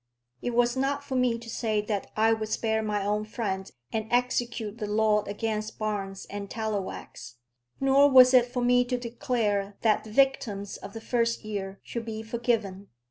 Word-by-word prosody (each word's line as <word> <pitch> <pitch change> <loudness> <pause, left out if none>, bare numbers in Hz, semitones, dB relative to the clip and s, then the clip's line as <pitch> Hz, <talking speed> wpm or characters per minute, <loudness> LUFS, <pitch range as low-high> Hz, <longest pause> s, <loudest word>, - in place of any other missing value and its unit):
It 245 - -2
was 240 +1 +3
not 275 +2 0
for 280 - -6
me 250 -2 +2
to 235 0 -11
say 220 -2 -1
that 210 -1 -3
I 225 +1 +4
would 220 -1 -3
spare 220 0 0
my 210 -2 -1
own 210 +1 0
friend, 200 -4 -3 0.2
and 220 -1 -1
execute 240 -3 0
the 210 - -3
law 210 0 +3
against 215 +1 -3
Barnes 200 -3 -3
and 200 0 -6
Tallowax; 210 - -5 0.4
nor 275 +1 +5
was 255 -1 +8
it 250 -1 +6
for 245 0 -2
me 245 0 +4
to 250 0 -1
declare 230 -5 -1
that 220 -2 +3
the 220 - -11
victims 215 -6 +1
of 200 +1 -10
the 225 - -7
first 230 -1 0
year 195 -2 -5
should 235 -1 -5
be 220 -1 -5
forgiven. 220 -4 -1
220 Hz, 180 wpm, -27 LUFS, 210-245 Hz, 0.4 s, was